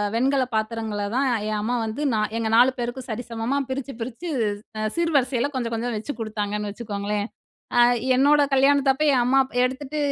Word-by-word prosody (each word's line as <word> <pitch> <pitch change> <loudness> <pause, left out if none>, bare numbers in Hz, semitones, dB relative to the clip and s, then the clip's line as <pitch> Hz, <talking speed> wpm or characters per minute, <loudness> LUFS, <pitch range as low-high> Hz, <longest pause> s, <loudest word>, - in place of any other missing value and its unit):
வெண்கலப் 260 0 +1
பாத்திரங்களை 220 -2 -2
தான் 270 0 +2 0.2
என் 215 -1 -1
அம்மா 240 +4 -1
வந்து 220 +6 -4 0.4
எங்க 225 -1 -1
நாலு 250 +2 +6
பேருக்கும் 245 +2 -4
சரிசமமா 230 +3 -3
பிரிச்சு 270 +1 -4
பிரிச்சு 255 +9 -5 0.5
அ 215 - 0
சீர்வரிசையில 280 -6 +1
கொஞ்சம் 235 -3 -2
கொஞ்சம் 235 +1 -2
வச்சு 230 +3 -6
கொடுத்தாங்கன்னு 210 -1 -3
வச்சுக்கோங்களேன். 205 -1 -3 0.5
அ - - +7 0.3
என்னோட 290 +3 +5
கல்யாணத்தப்ப 275 +1 +3
என் 255 - +3
அம்மா 260 +2 +3 0.2
எடுத்துட்டு 265 +4 -2
245 Hz, 150 wpm, -24 LUFS, 220-270 Hz, 0.5 s, அ